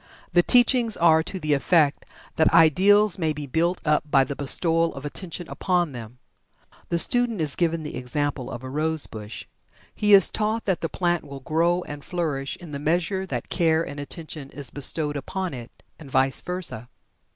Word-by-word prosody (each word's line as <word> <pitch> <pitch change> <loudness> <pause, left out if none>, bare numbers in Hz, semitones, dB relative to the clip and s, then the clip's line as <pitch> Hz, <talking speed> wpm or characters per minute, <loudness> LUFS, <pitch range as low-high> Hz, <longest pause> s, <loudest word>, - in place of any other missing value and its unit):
The 175 - +6
teachings 240 +1 +3
are 160 -1 +5
to 185 +4 -6
the 155 -3 0
effect 150 +1 +2 0.3
that 160 - +3
"ideals" 195 +5 +5
may 160 -3 0
be 150 0 -6
built 170 +6 0
up 150 -1 +2
by 135 -2 +4
the 140 +2 -5
bestowal 165 +4 +1
of 135 +1 -8
attention 170 +2 -6
upon 175 -4 0
them. 120 -1 -9 0.7
The 170 - 0
student 240 +3 +2
is 150 -4 -2
given 165 -2 0
the 150 - -6
example 130 +1 -3
of 120 - -7
a 130 - -6
rose 155 +1 -1
bush. 105 0 -9 0.5
He 210 -1 +2
is 195 - +7
taught 220 +1 -1
that 190 -3 0
the 165 - -2
plant 175 +1 -1
will 140 -2 -10
grow 170 +4 +1
and 145 -2 -9
flourish 150 -6 -3
in 170 -4 -11
the 140 - -5
measure 175 +5 -1
that - - -5
care 165 -1 +1
and 145 +1 -7
attention 150 -1 -7
is 140 -1 -4
bestowed 145 +1 0
upon 185 +5 -4
it 120 -2 -8 0.3
and 150 -4 -11
vice 130 0 +2
versa. 180 -10 -5
160 Hz, 185 wpm, -24 LUFS, 140-175 Hz, 0.7 s, is